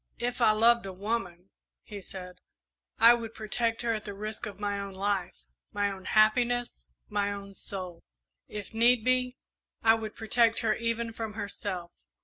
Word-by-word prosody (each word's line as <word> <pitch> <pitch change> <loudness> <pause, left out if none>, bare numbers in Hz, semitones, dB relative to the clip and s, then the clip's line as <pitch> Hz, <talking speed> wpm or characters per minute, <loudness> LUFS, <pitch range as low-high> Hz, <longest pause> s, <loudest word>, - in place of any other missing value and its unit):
"If 245 +1 -3
I 230 - +6
loved 230 0 +4
a 190 - -6
woman," 195 -3 -4 0.3
he 205 -2 -8
said, 180 -1 -10 0.6
"I 230 +1 +9
would 230 -1 -4
protect 225 +2 -1
her 230 -1 +1
at 215 -1 -3
the 205 -1 -7
risk 215 +2 -5
of 205 - -9
my 205 -1 -1
own 200 -1 -6
life, 195 -2 -1 0.4
my 205 0 +1
own 190 -1 -9
happiness, 240 +3 +2 0.2
my 205 -1 0
own 200 0 -7
soul. 185 -3 -7 0.5
If 210 +1 -7
need 235 0 +4
be, 255 0 +1 0.5
I 225 -1 +7
would 220 -1 -4
protect 230 +1 +3
her 220 -1 +2
even 230 0 -2
from 225 -1 -5
herself. 200 -4 -5
215 Hz, 165 wpm, -29 LUFS, 200-230 Hz, 0.6 s, I